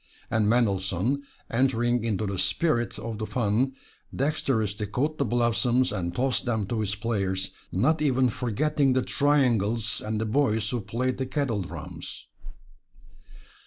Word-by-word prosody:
And 110 -2 +2
Mendelssohn, 105 +2 +1 0.3
entering 120 -1 +2
into 110 -2 0
the 100 -2 -2
spirit 120 - 0
of 115 -2 -5
the 110 - -3
fun, 120 +3 +1 0.4
dexterously 110 -8 0
caught 145 +9 -1
the 140 - +2
blossoms 120 +2 +2
and 85 -1 -2
tossed 130 +3 0
them 110 -4 0
to 115 - -1
his 105 -1 -1
players, 100 -4 -1 0.2
not 150 - +2
even 130 -3 +3
forgetting 135 +5 +1
the 130 0 +2
triangles 120 -7 +2
and 110 0 -2
the 110 - 0
boys 110 -2 +1
who 120 -2 -1
played 120 +6 -2
the 130 - -1
kettledrums. 120 - -4
120 Hz, 135 wpm, -27 LUFS, 105-130 Hz, 0.4 s, even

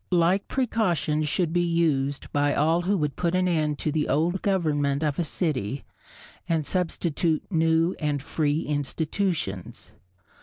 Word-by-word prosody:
Like 180 +2 +2
precautions 180 - 0
should 165 +2 0
be 175 - +3
used 155 -5 0
by 145 0 +2
all 160 +4 +3
who 195 +3 +1
would 150 -4 -1
put 175 0 0
an 185 0 +2
end 155 -4 +1
to 155 - -2
the 150 0 0
old 165 +7 +1
government 150 -7 +1
of 150 -1 -1
a - - +2
city 140 - -2 0.6
and 160 -3 +1
substitute 170 -1 0
new 165 +1 +2
and 150 -2 0
free 150 +2 0
institutions. 150 - -3
160 Hz, 145 wpm, -26 LUFS, 145-175 Hz, 0.6 s, be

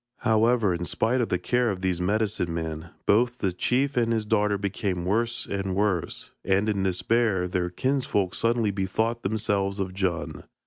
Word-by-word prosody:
However, 110 -3 +3
in 85 0 -3
spite 120 +8 +1
of 115 - -1
the - - +1
care 125 -1 +1
of 95 -3 -3
these 90 -2 0
medicine 100 -2 0
men, 80 0 -4 0.2
both 120 +4 +3
the 95 -6 -1
chief 135 +9 0
and 115 -2 +2
his 110 -2 0
daughter 105 -1 +2
became 95 -2 -2
worse 115 +4 0
and 95 -1 -3
worse, 100 -4 -1
and 100 +2 +2
in 105 -3 0
despair, 95 +1 +1
their 90 -1 -1
kinsfolk 105 -3 0
suddenly 115 -2 +2
bethought 110 +5 -1
themselves 100 -1 -1
of 95 -1 -2
Djun. 85 -5 -2
100 Hz, 170 wpm, -26 LUFS, 95-115 Hz, 0.2 s, However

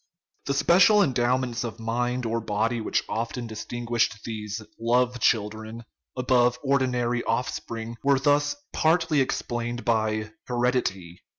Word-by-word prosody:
The 140 - 0
special 190 +7 +5
endowments 125 -3 0
of 115 -1 -6
mind 120 +2 -1
or 115 +1 -1
body 110 +2 -1
which - - 0
often 115 +3 -3
distinguished 115 0 -2
these 105 -1 -5 0.3
" 125 0 +2
children 110 +1 0
of - - -11
love - - -34
" - - -34
above 125 -1 +2
ordinary 125 -3 +1
offspring 115 -1 -3
were 140 0 +4
thus 145 - +2 0.2
partly 160 -2 +2
explained 120 -2 -3
by 110 -1 0
" - - -64
heredity." 120 -8 -1
120 Hz, 135 wpm, -26 LUFS, 115-125 Hz, 0.3 s, special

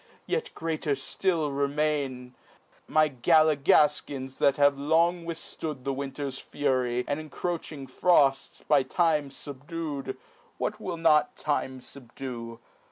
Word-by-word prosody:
yet 475 0 -1
greater 155 -3 -1
ftill 150 +2 -1
remain: 140 -3 -1 0.5
My 155 0 +4
Galligalkins 145 -1 +3
that 140 - +4
have 145 -1 +5
long 165 +4 +2
withftood 160 -4 -5
The 135 +1 -1
winter's 135 0 -4
fury, 125 -3 -1
and 145 +1 -1
incroaching 155 -2 -5
frofts, 135 -1 +2
By 145 -2 +5
time 150 +1 +1
fubdu'd, 145 +2 -6 0.4
(what 210 - -2
will 180 -4 -4
not 160 -2 +3
time 130 -3 -2
fubdue 120 -2 -8
145 Hz, 110 wpm, -27 LUFS, 135-160 Hz, 0.5 s, have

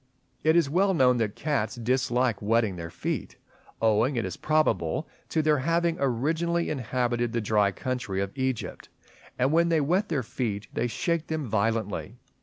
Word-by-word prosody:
It 160 +2 +4
is 170 -4 +4
well 190 +6 +2
known 125 -4 +4
that 110 -3 -1
cats 135 -7 -1
dislike 125 -1 0
wetting 110 -2 +2
their 85 -1 -6
feet, 85 +1 -4 0.5
owing, 115 +5 +3
it 115 - 0
is 90 -2 -4
probable, 125 - +1 0.2
to 160 - +1
their 150 -2 +3
having 170 +3 +1
aboriginally 160 +7 0
inhabited 120 -3 -1
the 120 - +1
dry 105 -2 +2
country 125 -4 -3
of 100 +3 -3
Egypt; 130 -3 -3 0.5
and 130 +3 +2
when 170 +1 +3
they 165 -1 +3
wet 180 +8 +1
their 145 -6 0
feet 110 -3 -3
they 120 - 0
shake 170 +6 -1
them 160 -2 -2
violently. 110 -2 -1
125 Hz, 165 wpm, -27 LUFS, 110-155 Hz, 0.5 s, It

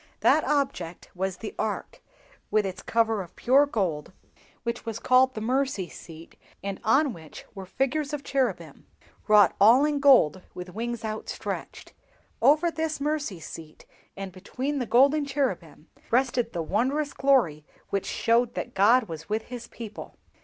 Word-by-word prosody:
That - - +4
object 270 - -2
was 190 0 -3
the 215 - -7
Ark, 215 -1 -3 0.5
with 215 -1 +2
its 185 -1 -5
cover 225 -2 +1
of 175 - -11
pure 275 +4 +4
gold 185 - -2 0.5
which 235 0 -3
was 225 -1 -4
called 255 +2 +3
the 215 - -4
'Mercy 255 -5 -1
seat,' 165 0 -13 0.3
and 195 -1 -4
on 270 +4 +3
which 160 -4 -12
were 195 -2 -8
figures 275 +7 -1
of 295 -2 -4
cherubim, 205 - -2 0.4
wrought 210 -1 +6
also 240 +7 +7
in 295 -1 0
gold, 255 - +5
with 180 0 -8
wings 235 +1 -4
outstretched. 215 0 -6 0.5
Over 305 +7 +4
this 320 -1 -3
Mercy 285 - -2
seat, 160 -1 -11 0.3
and 195 -1 -6
between 255 +10 -4
the 245 - -3
golden 280 +6 +4
cherubim 190 - -3 0.2
rested 245 -1 +1
the 170 - -3
wondrous 265 - 0
glory 245 - +2 0.3
which 200 -1 -1
showed 235 +1 +1
that 245 - -5
God 230 +6 +5
was 160 -4 -9
with 215 +1 -1
his 235 -1 -7
people. 220 -2 -9
230 Hz, 155 wpm, -26 LUFS, 190-270 Hz, 0.5 s, also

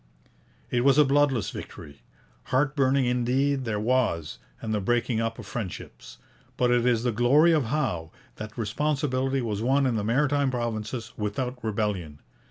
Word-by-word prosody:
It 120 0 +1
was 140 0 +5
a 150 - +7
bloodless 135 -5 +2
victory. 70 -1 -10 0.4
Heart 135 +2 +1
burning 135 -1 +2
indeed 130 +3 +1
there 105 -3 -1
was, 110 -9 0 0.2
and 110 -1 -3
the 105 - 0
breaking 120 +1 0
up 115 0 -2
of 120 - -9
friendships. 105 -3 -7 0.4
But 125 -1 +2
it 120 0 +3
is 120 -2 +2
the 125 - +1
glory 130 +9 +4
of 155 -5 +2
Howe 110 - -2 0.3
that 110 0 -8
responsibility 135 +2 0
was 105 -3 -3
won 135 +4 +2
in 120 -3 +1
the 105 - -1
Maritime 140 +4 +2
Provinces 115 -1 -4
without 125 +4 -3
rebellion. 100 -8 -2
120 Hz, 160 wpm, -26 LUFS, 110-135 Hz, 0.4 s, a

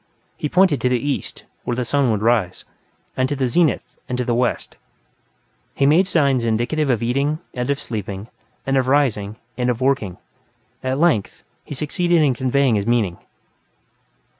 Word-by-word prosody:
He 150 - -3
pointed 180 -4 +3
to 125 - +2
the 125 - +2
east, 145 +1 -3 0.2
where 120 - -2
the 125 0 -2
sun 140 +1 +2
would 105 -2 0
rise, 110 -6 +1 0.5
and 130 0 +1
to 145 - -1
the 130 -2 0
zenith, 165 +5 +2 0.3
and 125 - -1
to 125 - -1
the 120 - 0
west. 125 +1 -1 1.0
He 135 - +2
made 165 +7 +4
signs 140 -9 +2
indicative 120 +7 0
of 120 -3 +1
eating, 140 +6 0 0.2
and 125 +1 -3
of 140 0 0
sleeping, 100 -2 -5 0.4
and 135 0 +1
of 130 -1 +1
rising, 120 -7 +1 0.2
and 125 0 +1
of 120 -1 -1
working. 130 -9 0 0.7
At 130 +1 -1
length, 150 - +1 0.2
he 145 - -7
succeeded 170 +3 +1
in 140 -3 +3
conveying 130 +1 +1
his 105 0 0
meaning. 110 -7 +1
130 Hz, 170 wpm, -21 LUFS, 115-145 Hz, 1.0 s, made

